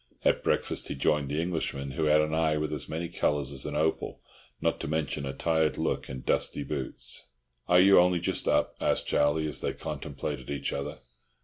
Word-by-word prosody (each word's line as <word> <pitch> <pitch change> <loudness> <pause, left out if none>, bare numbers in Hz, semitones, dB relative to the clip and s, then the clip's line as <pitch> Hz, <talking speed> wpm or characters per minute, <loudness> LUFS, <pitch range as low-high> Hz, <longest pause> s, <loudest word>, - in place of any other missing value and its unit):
At - - +3
breakfast - - 0
he - - -4
joined 75 0 +1
the 75 +2 -1
Englishman, 80 -5 -2
who 80 +4 -1
had 75 0 +5
an 75 0 -1
eye 80 -1 +2
with 75 0 -2
as 75 - -4
many 80 +2 -3
colours 75 -4 0
as 70 0 -4
an 75 - -4
opal, 80 +1 0 0.4
not - - 0
to - - -4
mention 75 -2 -1
a 65 - -3
tired 80 0 +1
look - - -1
and 65 -1 -7
dusty 75 - +1
boots. 65 -4 -3 0.4
"Are 90 0 +6
you 95 +1 +8
only 90 0 +4
just 85 - -2
up?" - - +2
asked - - +1
Charlie, 75 +2 +2
as 75 - +1
they - - -1
contemplated 70 -4 -5
each 70 -1 -2
other. 70 - -4
75 Hz, 200 wpm, -29 LUFS, 70-80 Hz, 0.4 s, you